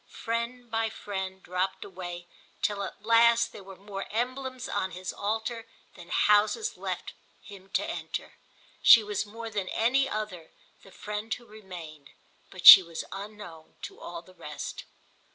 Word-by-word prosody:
Friend 235 +1 -4
by 225 0 0
friend 190 -3 -6
dropped 185 +1 -2
away 175 -2 -8 0.4
till 205 -2 0
at 200 +1 -7
last 230 +1 +5
there 205 - -11
were 190 0 -11
more 195 0 -7
emblems 255 +3 -3
on 190 - -1
his 185 0 -6
altar 225 +2 -3 0.3
than 175 -2 -13
houses 210 - +3
left - - -5 0.3
him 195 -2 -13
to - - +1
enter. - - -6 0.4
She 230 - +9
was 210 0 -3
more 225 +2 -8
than 200 -3 -3
any 265 +4 +2
other 205 -8 -5 0.3
the - - -16
friend 210 +3 -6
who 240 - -15
remained, 175 -9 -11 0.4
but 185 -3 -10
she - - +14
was 170 -2 -7
unknown 195 -5 -9
to - - -8
all 170 -1 -8
the 185 - -18
rest. 150 -4 -7
205 Hz, 150 wpm, -28 LUFS, 185-230 Hz, 0.4 s, she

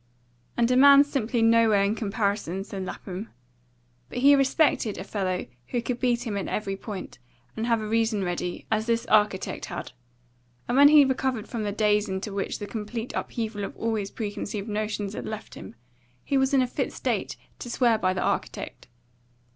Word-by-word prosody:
"And 235 +1 +3
a - - +4
man's 280 +2 +8
simply 235 -3 0
nowhere 225 -3 +5
in 200 +1 +1
comparison," 200 -4 -1
said 195 -2 -6
Lapham. 190 +3 -6 0.8
But - - -7
he 275 +3 +6
respected 275 -5 +2
a - - -5
fellow 190 -3 -2 0.2
who 245 - -1
could 245 -1 -3
beat 245 -1 +1
him 215 -3 -3
at 195 - -3
every 195 -2 -2
point, 195 - -8 0.4
and 225 +1 -2
have 230 -2 +2
a 215 - -4
reason 220 -2 +1
ready, 175 0 -3
as 220 +1 +1
this 230 0 +1
architect 210 -3 +1
had; - - -6 0.8
and 245 - 0
when 285 +1 +8
he 295 -1 +7
recovered 265 -4 -1
from 235 - -4
the 205 -1 -1
daze 210 0 +2
into 190 +2 -4
which 195 0 -2
the 205 - -6
complete 225 +2 -5
upheaval 220 -3 -3
of - - -6
all 230 0 -1
his 205 -2 -2
preconceived 205 -1 -5
notions 210 -1 -2
had - - -6
left 215 0 -7
him, 95 - -10 0.5
he 280 - -1
was 265 0 +3
in 270 -2 +4
a - - -1
fit - - -2
state - - -2 0.2
to 240 - -7
swear 235 -2 +2
by 185 -3 +2
the 185 - -2
architect. - - -3
220 Hz, 185 wpm, -26 LUFS, 200-240 Hz, 0.8 s, man's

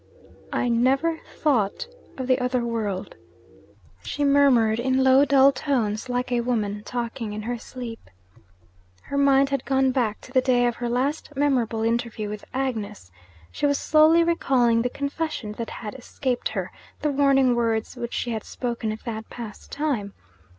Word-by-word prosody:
'I 245 - 0
never 270 +8 +2
thought 270 - 0 0.3
of 260 - -3
the 255 0 +2
other 250 -1 0
world,' 215 -5 -3 0.9
she 290 - -3
murmured, 265 -6 +4
in 260 +1 +2
low 265 +2 +6
dull 275 0 +6
tones, 250 -5 -1
like 250 0 -2
a 240 -1 +2
woman 210 -4 -1
talking 235 -2 -4
in 210 0 -5
her 240 +1 -3
sleep. 235 - -8 0.9
Her 280 - -4
mind 275 0 +4
had 275 -2 -1
gone 265 -1 +2
back 235 -5 0
to - - -14
the 260 -1 +4
day 250 -1 +3
of 240 -1 0
her 240 -1 -3
last 265 +6 -1
memorable 245 -6 +1
interview 230 -2 -1
with 210 0 -7
Agnes; 220 - -4 0.4
she 290 - 0
was 285 0 +2
slowly 315 +2 +5
recalling 255 -9 +2
the 250 - 0
confession 280 -4 -3
that 230 - -3
had 210 -2 -7
escaped 255 0 -3
her, - - -4 0.3
the 300 - +2
warning 270 -2 +4
words 230 -1 -1
which 240 -1 -5
she 240 - -2
had 220 -2 -3
spoken 235 -3 -3
at 215 - -7
that 220 -2 -6
past 230 -3 -9
time. 260 -10 -2
245 Hz, 165 wpm, -24 LUFS, 230-275 Hz, 0.9 s, low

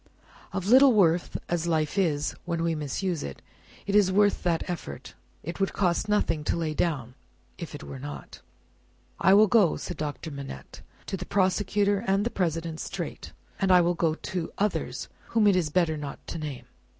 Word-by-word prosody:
Of 190 -2 -3
little 260 +4 +7
worth 175 -4 +3
as 170 -1 -1
life 155 -1 0
is 155 -7 +1
when 170 -1 -1
we 170 -1 +1
misuse 155 +3 -2
it, 70 - -6 0.5
it 200 - -2
is 200 -3 +5
worth 205 +1 +3
that 170 -2 0
effort. 155 - -6 0.3
It 170 +5 -6
would 195 - 0
cost 180 +2 0
nothing 185 -7 +1
to - - +1
lay 160 -2 -1
down 140 -7 -1 0.5
if 170 -3 -6
it 145 - -9
were 135 - -8
not." 145 +2 -8 0.8
"I 190 +2 +6
will 215 +2 +7
go," 205 -5 +4
said - - -6
Doctor 150 +1 -4
Manette, 140 - -8 0.2
"to 195 - -3
the 180 - -6
Prosecutor 200 +1 +1
and 195 +2 +2
the 240 - -1
President 165 -3 -2
straight, - - -6 0.3
and 195 -3 +2
I 180 -1 +7
will 175 +1 +2
go 165 -2 +1
to 175 0 -4
others 210 0 -1 0.2
whom 225 -2 +2
it 200 -2 +5
is 175 -4 +1
better 160 -1 +1
not 145 -2 -7
to 165 - -4
name. 145 -5 -6
170 Hz, 185 wpm, -27 LUFS, 155-195 Hz, 0.8 s, little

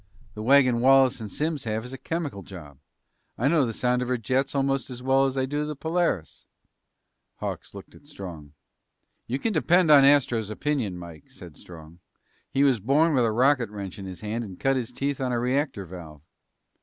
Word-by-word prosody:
The 105 - -7
wagon 130 0 +4
Wallace 130 -1 +4
and 105 -3 -7
Simms 150 -3 -2
have 110 +1 -2
is 125 - -9
a - - -6
chemical 155 -12 -4
job. 75 -9 -12 0.6
I 125 - +1
know 150 -4 +3
the - - -2
sound 125 +2 0
of 125 - -2
her 125 0 0
jets 130 +5 -1
almost 135 -1 0
as 125 -1 -8
well 135 +1 +3
as 135 0 -2
I 130 - +1
do 145 +2 -2
the 150 0 -4
Polaris." 160 - -2 0.9
Hawks - - -6
looked - - -11
at 145 - -18
Strong. 85 - -10 0.7
"You 125 - -1
can 220 +9 -2
depend 175 0 +3
on 140 -2 +8
Astro's 125 -6 +3
opinion, 110 -5 -2
Mike," 85 -4 -11
said - - -12
Strong. 80 -1 -13 0.5
"He 135 - +1
was 135 -5 +3
born 145 - +2
with 125 -4 +3
a 110 - +1
rocket 125 0 +2
wrench 100 -2 -7
in 95 - -7
his 90 -1 -9
hand 110 +2 -3
and 95 -5 -10
cut 135 0 +2
his 125 -3 -3
teeth 140 0 -3
on 130 -1 -1
a 120 - 0
reactor 130 -3 -1
valve." 80 -4 -11
125 Hz, 200 wpm, -25 LUFS, 105-140 Hz, 0.9 s, on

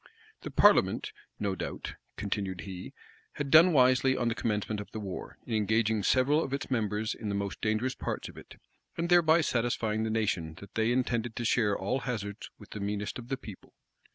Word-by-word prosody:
The - - -6
parliament, - - +4 0.3
no 100 -2 0
doubt, 95 - -5 0.2
continued 100 -3 -3
he, 95 -2 -7 0.4
had 140 -2 -4
done 165 +3 +8
wisely 130 -2 +4
on 120 -1 +1
the - - 0
commencement 105 -1 -2
of 105 - -10
the 110 - -6
war, 95 -3 -6
in 115 - -4
engaging 110 0 +2
several 135 +9 +3
of 135 - -5
its 140 - -6
members 110 -2 0
in 110 - -5
the 100 - -1
most 100 0 -3
dangerous 110 +4 0
parts - - -4
of - - -12
it, - - -12 0.4
and 170 +1 -1
thereby 170 -2 +5
satisfying 115 -5 0
the 110 - -1
nation 95 -8 -1
that 100 +2 -13
they 115 +1 +1
intended 120 -2 0
to 120 - -3
share 105 -3 +2
all 115 +8 -1
hazards 110 -6 -5
with - - -15
the 105 - -6
meanest 105 +3 -3
of 120 - -9
the 135 - -2
people. 105 -7 -12
110 Hz, 195 wpm, -30 LUFS, 105-130 Hz, 0.4 s, done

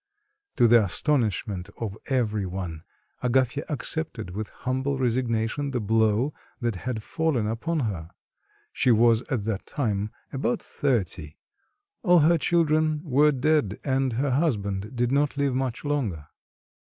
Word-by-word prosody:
To 120 - +5
the 115 -1 +6
astonishment 105 - -1
of 105 -4 -3
every 110 -7 0
one, 90 -4 -5 0.4
Agafya 130 +2 +1
accepted 145 - -3
with 105 +3 -4
humble 130 +2 -2
resignation 120 +1 0
the 130 -2 -1
blow 110 +5 +2 0.3
that 120 -4 -1
had 110 +3 -4
fallen 160 -8 0
upon 145 +9 -1
her. 90 -9 -3 0.6
She - - +1
was 115 0 +5
at 120 -6 0
that 105 -2 -3
time 105 -7 -1 0.2
about 130 -2 0
thirty, 95 - -2 0.7
all 175 -5 +5
her 165 +2 +4
children 155 -1 +2
were 150 -1 +4
dead 140 -6 +1
and 135 -2 +1
her 135 +4 0
husband 105 - -1
did 120 0 +1
not 145 +1 +1
live 140 -2 +1
much 130 +1 -2
longer. 110 - -2
125 Hz, 135 wpm, -26 LUFS, 105-145 Hz, 0.7 s, the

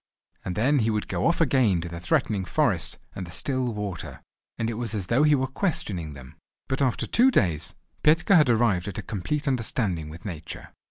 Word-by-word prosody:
And 90 - -4
then 135 +8 +3
he 115 -1 +1
would 105 -1 -1
go - - 0
off 170 - +1
again 130 - +3
to 85 - -5
the 85 0 -6
threatening 95 +3 0
forest, - - 0 0.2
and 95 -2 -6
the - - -10
still 130 +5 0
water, 105 -5 -6 0.3
and 115 - -1
it 115 - -2
was 115 -1 -3
as 100 -4 -3
though 120 +9 +2
he 150 -1 +5
were 130 -1 0
questioning 110 - -2
them. 65 -2 -12 0.3
But 130 +1 -1
after 130 -3 +1
two 250 +3 +4
days 85 - +1 0.3
Petka 165 +6 +4
had 150 -6 +5
arrived 110 -6 +2
at 100 - -5
a - - -4
complete 140 - -3
understanding 110 - -1
with 85 +7 -11
Nature. 85 -5 -7
110 Hz, 205 wpm, -26 LUFS, 90-135 Hz, 0.3 s, he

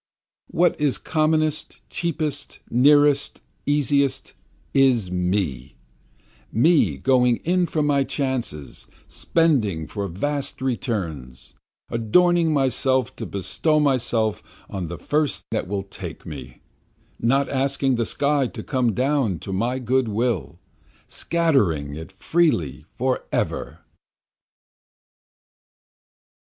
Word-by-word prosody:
What 175 -2 +1
is 145 -3 +2
commonest, 155 -1 0
cheapest, 155 -4 -3
nearest, 145 +2 +4 0.3
easiest, 145 -1 +1 0.4
is 125 -9 +3
Me, 90 -9 -1 0.8
Me 120 - +3
going 125 - +3
in 180 +1 +2
for 155 -2 0
my 140 -2 +2
chances, 120 - -4 0.2
spending 120 - +1
for 100 +2 -4
vast 140 - -3
returns, 85 - -4 0.4
Adorning 165 +9 +3
myself 130 -3 +1
to - - -5
bestow 150 - 0
myself 120 -6 +1 0.3
on 95 -3 -3
the 85 +1 -6
first 150 - -1
that - - -1
will 100 0 -2
take 95 - -8
me, - - -9 0.6
Not 135 +4 +2
asking 135 0 +1
the 115 -1 0
sky 140 -2 +1
to - - -8
come 125 -5 0
down 130 - +1
to 95 - -5
my 120 +7 0
good 130 0 +1
will, 105 - -1 0.5
Scattering 105 - +1
it 80 +5 -8
freely 95 - 0
forever. 130 +1 -2
130 Hz, 100 wpm, -23 LUFS, 100-145 Hz, 0.8 s, nearest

